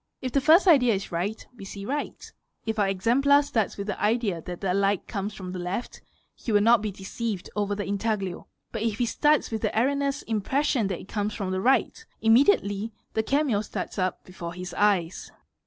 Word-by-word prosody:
If 255 - -4
the 275 - +2
first 325 +7 +6
idea 250 - +6
is 195 - -5
right, 185 +6 -3
we 215 - -11
see 195 0 -7
right 290 +6 -4 0.3
if 220 -1 -2
our 200 - +3
exemplar 260 +9 +3
starts 225 -7 -1
with 200 - -4
the 210 - -4
idea 210 -5 +1
that 175 +1 -7
the 185 -2 0
light 200 0 +1
comes 205 -1 -4
from 185 -2 -7
the 185 - -5
left 180 +7 -4 0.3
he 235 - -5
will 205 - +5
not 230 +1 +5
be 210 -1 -2
deceived 195 +1 -5
over 205 -1 0
the 205 - -3
intaglio, 200 -3 -2 0.2
but 225 - -4
if 220 -2 -1
he 245 - +1
starts 295 +5 +2
with 220 -1 -2
the - - +1
erre 255 +5 +3
neous 280 0 -1
impression 230 +2 0
that 190 -3 -4
it - - -13
comes 205 0 -2
from 195 -3 -3
the 185 0 -1
right, 265 - +2 0.2
immediately 225 - +3 0.2
the 220 - +1
came 270 -3 +1
starts 210 - -5
up 185 0 -1
before 170 -2 -8
his 180 0 -7
eyes. 190 -5 +1
210 Hz, 205 wpm, -26 LUFS, 195-240 Hz, 0.3 s, first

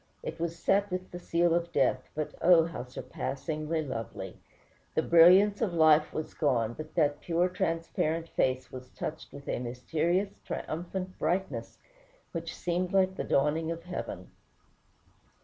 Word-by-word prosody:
It 160 - -5
was 170 0 -2
set 200 +4 +2
with 185 0 -4
the 175 - -6
seal 170 -1 +2
of 170 0 0
death; - - +1
but 155 0 -3
oh, 170 -2 +6
how 165 -7 -5
surpassingly 155 +5 -3
lovely! 115 -5 -5 0.6
The - - +2
brilliancy 185 +6 +6
of 185 -6 -1
life 155 -1 +5
was 155 - -4
gone, 120 -7 +1
but 155 +4 -9
that 145 -3 +2
pure, 175 +1 +1
transparent 165 -2 -1
face 130 0 0
was 130 0 -9
touched 155 - -6
with 140 0 -11
a - - -1
mysterious, 160 +11 -1
triumphant 185 +3 -5
brightness, 180 +5 -2 0.5
which 165 -1 -5
seemed 180 +2 -1
like 190 -1 +3
the - - -3
dawning 150 +3 +1
of 165 0 -4
heaven. 180 0 -6
165 Hz, 150 wpm, -30 LUFS, 150-180 Hz, 0.6 s, oh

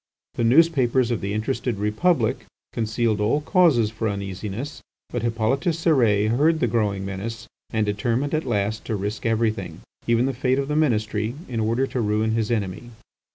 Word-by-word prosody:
The - - -2
newspapers 130 -2 +4
of 120 - -1
the 100 - -3
interested 110 +1 -2
Republic 115 - +1 0.3
concealed 110 -1 0
all 120 +8 +2
causes 150 - +3
for 110 0 -2
uneasiness; 100 +7 -5 0.3
but - - -2
Hippolyte 115 +3 0 0.2
Cérès 120 - +3
heard 155 +7 +3
the - - +2
growing 100 -4 0
menace, 100 +4 -5 0.2
and 110 -1 0
determined 115 +7 -1
at 155 - +1
last 110 -2 -1
to 110 - -2
risk 105 +3 -3
everything, 115 -1 -1 0.3
even 120 +1 +3
the 135 - -1
fate 130 +1 +1
of 140 0 -2
the 150 - 0
ministry, 110 -6 0
in 120 -3 -3
order 115 +4 +1
to 130 -2 -3
ruin 110 +1 +1
his 110 -1 0
enemy. 110 0 -2
115 Hz, 165 wpm, -23 LUFS, 105-130 Hz, 0.3 s, newspapers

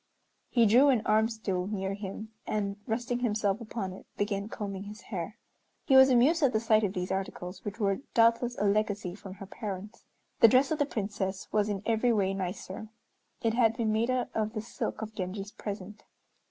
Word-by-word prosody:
He 235 -2 +4
drew 250 +7 +6
an 245 -5 +3
"arm 220 +1 +3
stool" 195 -5 -2
near 195 -2 -2
him, 200 +2 -6 0.2
and 200 -1 -1
resting 240 +2 -1
himself 215 -3 0
upon 215 -4 -4
it 185 - -12
began 205 0 -1
combing 200 -2 -5
his 210 0 -9
hair. 195 +2 -5 0.5
He 270 - +4
was 265 0 +9
amused 265 +7 +4
at 275 -4 +4
the 220 - +3
sight 220 -1 +3
of 195 -2 0
these 180 -1 -3
articles, 185 -1 -4
which 205 +2 -6
were 195 -2 +1 0.2
doubtless 230 +1 +4
a - - -1
legacy 205 -2 +1
from 195 -1 -10
her 195 - -9
parents. 205 +1 -7 0.4
The 230 - +9
dress 260 +5 +4
of 315 - 0
the 290 - +2
Princess 200 -4 -3
was 210 0 +2
in 200 -1 -3
every 230 +2 +2
way 195 -4 +2
nicer. 190 +2 -5 0.5
It 225 -1 +2
had 225 -2 +3
been 225 -2 +1
made 225 +3 +1
out 255 -1 0
of 215 0 -1
the 215 - -3
silk 225 -1 -4
of 220 0 -7
Genji's 195 +1 -4
present. 205 0 -7
215 Hz, 195 wpm, -30 LUFS, 195-230 Hz, 0.5 s, was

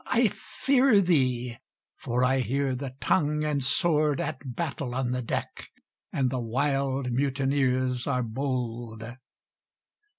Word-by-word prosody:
I - - +3
fear 265 -5 +2
thee, 125 -9 +1 0.4
for 125 +2 -1
I 130 +1 +3
hear 135 +3 0
the 130 0 -5
tongue 150 0 +1
and 150 -2 0
sword 150 +1 +2
At 130 -2 -4
battle 140 -6 -3
on 130 -1 -1
the 125 0 -1
deck, 115 - -4 0.4
and 130 -3 0
the 130 - -1
wild 135 +2 0
mutineers 130 -1 0
are 125 -3 +1
bold! 120 -2 -3
130 Hz, 125 wpm, -27 LUFS, 125-140 Hz, 0.4 s, I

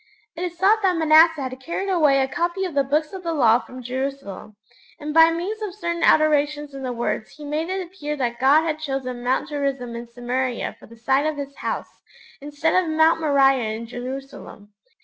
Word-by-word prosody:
It 335 - -7
is 350 -1 -4
thought 410 +4 +3
that 370 -3 +2
Manasseh 320 -1 +5
had 255 0 -6
carried 340 +8 -4
away 305 -8 +3
a 265 - +1
copy 345 +6 -2
of 360 - -5
the 280 -1 +2
Books 300 +4 -1
of 380 - -6
the 335 -2 -3
Law 235 -5 +4
from 255 0 -11
Jerusalem, 255 -5 -5 0.4
and 300 0 -5
by 325 +1 +7
means 365 +7 -3
of 405 -3 -5
certain 340 -4 -3
alterations 295 -1 +2
in 275 - -7
the 255 -1 -3
words 235 -2 -3
he 300 - -9
made 305 +4 -2
it 380 0 -2
appear 300 -4 -5
that 240 -4 -2
God 280 +5 +5
had 310 -2 -2
chosen 265 -4 -4
Mount 255 +4 0
Gerizim 275 -5 -3
in 235 0 -7
Samaria 245 +1 -3
for - - -15
the 230 - -15
site 270 +6 +1
of 310 -1 -2
His 280 -1 -6
House, - - -5 0.4
instead 295 +5 +1
of 335 - -4
Mount 320 +1 +3
Moriah 270 -7 +3
in 230 +1 -6
Jerusalem. 245 -4 -8
290 Hz, 205 wpm, -22 LUFS, 255-325 Hz, 0.4 s, by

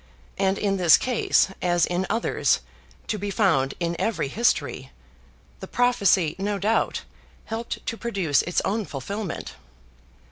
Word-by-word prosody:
And 195 0 +2
in 195 -1 0
this 175 -4 +6
case, 250 -5 +2
as 175 -1 +2
in 180 +2 -2
others, 230 - +1 0.4
to 210 - -3
be 205 +1 -3
found 185 - +2
in 170 -1 -1
every 220 -11 -1
history, 235 - 0 0.7
the - - -8
prophecy, 200 -10 +2
no 205 +1 -1
doubt, 210 +4 0 0.4
helped 225 +1 -5
to 230 - -3
produce 195 -12 +1
its 175 - -1
own 215 +3 0
fulfilment. 195 - -5
195 Hz, 135 wpm, -24 LUFS, 175-220 Hz, 0.7 s, this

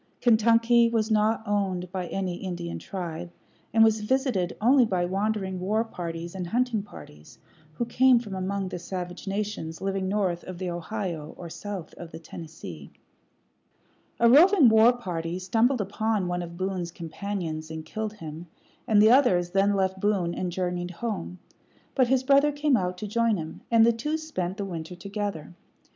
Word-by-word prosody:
Kentucky 230 +1 +4
was 225 -1 0
not 215 +1 +2
owned 190 -3 -1
by 185 -2 -3
any 185 -2 -3
Indian 175 -3 -5
tribe, 175 -2 -6 0.4
and 225 0 +5
was 220 -1 +3
visited 215 -6 0
only 255 +4 +5
by 185 -6 0
wandering 195 0 -1
war 210 +5 +1
parties 170 -5 -6
and 185 -2 -4
hunting 240 +1 0
parties 75 - -13 0.4
who 240 - -2
came 255 +2 +5
from 225 -4 -4
among 190 +1 -2
the 180 - -5
savage 180 +1 -6
nations 195 -5 -3
living 195 -1 -2
north 190 -4 0
of 185 -1 -7
the 180 -1 -3
Ohio 175 -3 -5
or 170 -2 -8
south 195 -4 -6
of 170 - -8
the - - -9
Tennessee. 155 - -9 1.3
A 235 - +5
roving 310 - +7
war 220 +2 +6
party 175 -8 -4
stumbled 225 +7 +2
upon 205 0 -1
one 175 0 -2
of 170 0 -8
Boone's 185 -2 -2
companions 165 -2 -5
and 160 0 -6
killed 215 +5 -4
him, 165 -4 -9 0.4
and 210 -1 +5
the 220 - +7
others 185 -10 +4
then 195 +2 +3
left 190 -1 0
Boone 190 -4 +1
and 180 0 -3
journeyed 180 0 -2
home; 180 -2 -4 0.6
but 255 -3 +3
his 260 +1 +2
brother 280 +2 +4
came 290 -1 +2
out 180 -4 -1
to 210 - -5
join 230 0 +1
him, 160 -1 -7
and 230 -1 +6
the 235 - +4
two 300 +8 -2
spent 195 - -4
the 200 - -3
winter 170 -2 -6
together. 200 -3 -5
195 Hz, 170 wpm, -26 LUFS, 175-225 Hz, 1.3 s, roving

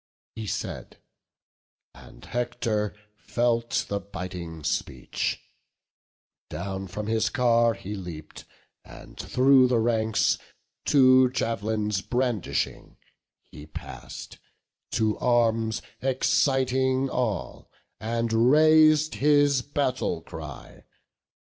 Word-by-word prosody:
He 110 -1 -6
said; - - -5 1.0
and - - -15
Hector 115 -4 -2 0.2
felt 120 -1 0
the 100 - -2
biting 90 -5 -7
speech; 65 -3 -2 1.1
Down 95 +4 -5
from 105 +4 -5
his 110 0 +1
car 115 -2 +3
he 100 +1 -7
leap'd; 85 -6 -8 0.4
and - - -13
through 130 0 +4
the 125 -1 +2
ranks, 110 -1 +1 0.5
Two 130 -2 +6
jav'lins 105 -4 -1
brandishing, 120 -4 -2 0.5
he 75 - -13
pass'd, - - -9 0.5
to 110 -1 0
arms 115 -2 +1 0.2
Exciting 130 0 +1
all, 115 -9 -3 0.3
and 115 +1 -2
rais'd 155 +5 +5
his 145 -2 +3
battle 130 - -2
cry. 75 -5 -10
115 Hz, 90 wpm, -26 LUFS, 100-130 Hz, 1.1 s, Two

